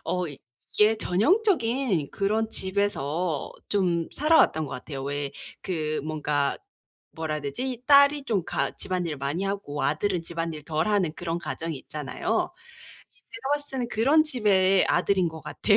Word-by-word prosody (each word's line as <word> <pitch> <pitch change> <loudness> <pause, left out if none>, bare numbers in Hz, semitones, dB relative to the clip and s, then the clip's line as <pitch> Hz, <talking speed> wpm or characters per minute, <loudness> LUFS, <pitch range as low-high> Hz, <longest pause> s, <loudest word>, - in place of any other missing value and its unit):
어 180 -1 -1
이게 145 - 0
전형적인 245 - +2
그런 215 +2 0
집에서 180 -6 -1 0.2
좀 175 -5 +1
살아왔던 300 - +4
것 - - -9
같아요. 135 +1 -6
왜 140 0 -3 0.3
그 155 -4 -2
뭔가 150 -2 0 0.6
뭐라 160 -1 -2
해야 150 - -3
되지? 245 - -4
딸이 280 0 +6
좀 205 -9 0
가 - - -1
집안일을 175 -5 -2
많이 145 +7 -2
하고 195 -7 -3
아들은 175 +4 0
집안일 165 -3 -4
덜 160 +2 0
하는 195 -7 +2
그런 170 -1 -3
가정이 160 0 -4
있잖아요. 150 - -2 0.6
이 - - -36 0.2
제가 230 +4 -5
봤을 290 0 -6
때는 250 -3 -2
그런 275 +8 +4
집의 195 -8 +3
아들인 185 -4 +2
것 160 0 -9
같아요. 205 +7 +2
180 Hz, 300 characters per minute, -26 LUFS, 155-225 Hz, 0.6 s, 딸이